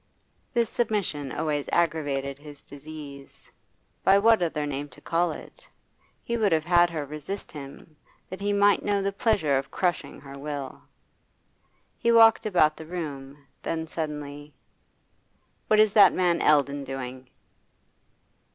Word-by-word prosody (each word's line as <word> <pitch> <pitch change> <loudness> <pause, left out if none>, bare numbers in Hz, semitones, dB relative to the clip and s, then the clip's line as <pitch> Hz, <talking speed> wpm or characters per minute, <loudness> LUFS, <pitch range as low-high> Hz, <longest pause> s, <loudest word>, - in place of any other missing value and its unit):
This 235 -2 +1
submission 200 - -2
always 150 -2 -2
aggravated 145 -5 0
his 145 -1 -13
disease 145 -1 -11 0.5
by 195 - +6
what 225 0 +4
other 160 -3 -1
name 145 0 -4
to 125 - -16
call 170 0 0
it? - - -12 0.5
He 235 - -2
would 215 -3 +2
have 160 -1 +1
had 175 0 +4
her 155 -3 -4
resist 150 +7 -7
him, 145 +2 -11 0.3
that 185 - -8
he 205 0 0
might 205 0 +4
know 200 -1 0
the 200 - 0
pleasure 160 - +1
of 135 0 -8
crushing 175 +3 -2
her 140 -1 -11
will. 140 -2 -6 1.2
He 235 - +2
walked 225 -1 +6
about 155 -6 +3
the 160 - -10
room, 145 -5 -7 0.2
then 160 -1 -3
suddenly: 150 -2 -6 1.1
'What 215 - +4
is 215 -2 +5
that 200 -3 +7
man 175 -2 +1
Eldon 145 -1 +3
doing? 130 -1 -7
155 Hz, 140 wpm, -26 LUFS, 140-195 Hz, 1.2 s, that